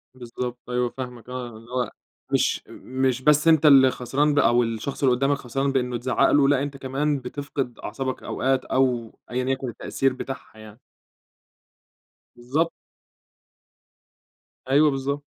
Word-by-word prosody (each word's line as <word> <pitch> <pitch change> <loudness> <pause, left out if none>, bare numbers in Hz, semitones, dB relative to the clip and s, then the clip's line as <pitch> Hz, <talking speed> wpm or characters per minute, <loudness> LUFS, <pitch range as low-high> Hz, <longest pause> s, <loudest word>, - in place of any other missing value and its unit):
بالضبط 125 0 -6
أيوه 125 0 0
فاهمك، 125 -2 -7
آه 125 -1 -5
اللي 115 +2 -15
هو 125 -1 -1 0.4
مش - - +1
مش 130 -1 -2
بس 150 +3 +4
أنت 160 -1 +5
اللي 135 -3 +8
خسران 140 +5 0
بقى، 145 -1 +4
أو 120 +1 +4
الشخص 115 +5 -4
اللي 125 -2 +5
قدامك 140 +2 +1
خسران 135 +2 -2
بأنّه 125 -2 0
اتزعّق 130 +2 +2
له، 140 -1 +5
لأ 140 -1 +3
أنت 140 -1 -5
كمان 140 +2 -1
بتفقد 135 -1 -5
أعصابك 130 +4 -4
أوقات 130 0 0
أو 125 -4 0
أيًا 125 +1 -1
يكن 130 -1 -1
التأثير 135 +3 -1
بتاعها 130 -3 -8
يعني. 110 +2 -13 1.6
بالضبط. 140 +8 -1 2.0
أيوه 150 +2 +5
بالضبط. 140 +1 -2
130 Hz, 140 wpm, -24 LUFS, 125-140 Hz, 2.0 s, اللي